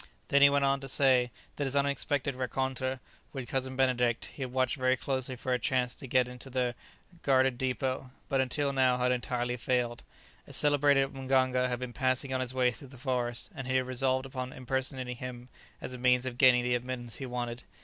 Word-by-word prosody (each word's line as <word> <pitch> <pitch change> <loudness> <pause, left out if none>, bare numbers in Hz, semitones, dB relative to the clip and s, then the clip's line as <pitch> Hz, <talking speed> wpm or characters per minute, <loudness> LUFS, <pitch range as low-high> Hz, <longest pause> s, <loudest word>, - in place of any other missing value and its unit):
Then 140 - +4
he 140 - +9
went 140 0 +2
on 135 0 +2
to 135 - -7
say 130 -2 +3 0.3
that 145 - -1
since 135 - -2
his - - -2
unexpected 140 0 0
rencontre 130 +1 -2 0.3
with 130 -3 -5
Cousin 130 +1 -2
Benedict 125 -3 +2
he - - -10
had 130 -2 -3
watched 130 0 +1
very 130 0 +2
closely 130 0 -2
for 125 +1 -2
a 125 - +1
chance 125 +1 0
to 135 - -9
get 125 0 +3
into 125 +1 -9
the 125 -1 0 0.5
guardeddépôt, 130 0 +1 0.2
but 135 -2 +2
until 140 +2 0
now 130 -2 +3
had 125 0 +2
entirely 125 0 -1
failed. 120 0 0 0.5
A - - -11
celebrated 145 -2 +3
mganga 130 -1 +2
had 125 - -1
been 125 -1 -6
passing 130 +1 0
on 130 - 0
his 125 -1 -2
way 130 -1 +2
through 135 +3 -10
the 130 0 -14
forest, 120 -2 -1
and 135 -1 -6
he 130 - 0
had 130 0 +2
resolved 130 +1 0
upon 130 -1 -5
impersonating 130 -1 -3
him 125 0 -7 0.3
as - - -6
a 125 - -5
means 125 0 +3
of 125 -1 -5
gaining 125 -2 +6
the 125 0 +1
admittance 120 -1 -3
he 135 - -5
wanted. 120 -1 -4
130 Hz, 205 wpm, -30 LUFS, 125-135 Hz, 0.5 s, he